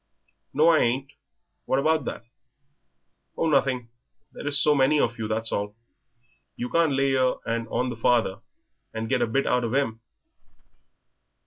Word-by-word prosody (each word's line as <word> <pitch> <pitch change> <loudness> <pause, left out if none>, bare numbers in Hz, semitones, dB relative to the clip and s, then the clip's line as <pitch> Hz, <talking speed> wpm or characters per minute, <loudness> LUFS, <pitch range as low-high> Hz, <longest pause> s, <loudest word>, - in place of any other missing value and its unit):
"No, 155 +4 +4
I 160 -2 +5
ain't; 130 +4 0 0.5
what 130 - +1
about 155 0 +1
that?" 115 - -6 1.1
"Oh, 165 - +1
nothing; 135 -5 +1 0.4
there - - -8
is 145 -1 +3
so 150 - +4
many 145 +2 +3
of 120 -2 0
you, 110 - -2
that's 110 +1 -2
all. 105 0 -3 0.8
You 125 - -4
can't 165 -3 +3
lay 135 0 +2
yer 130 -1 +2
'and 115 0 -2
on 125 +2 -1
the - - -5
father 115 -4 +1 0.6
and 110 0 -3
get 135 - +1
a - - +2
bit 135 +5 0
out 125 - +1
of 120 +2 -2
'im?" 115 -5 -1
130 Hz, 160 wpm, -25 LUFS, 115-140 Hz, 1.1 s, I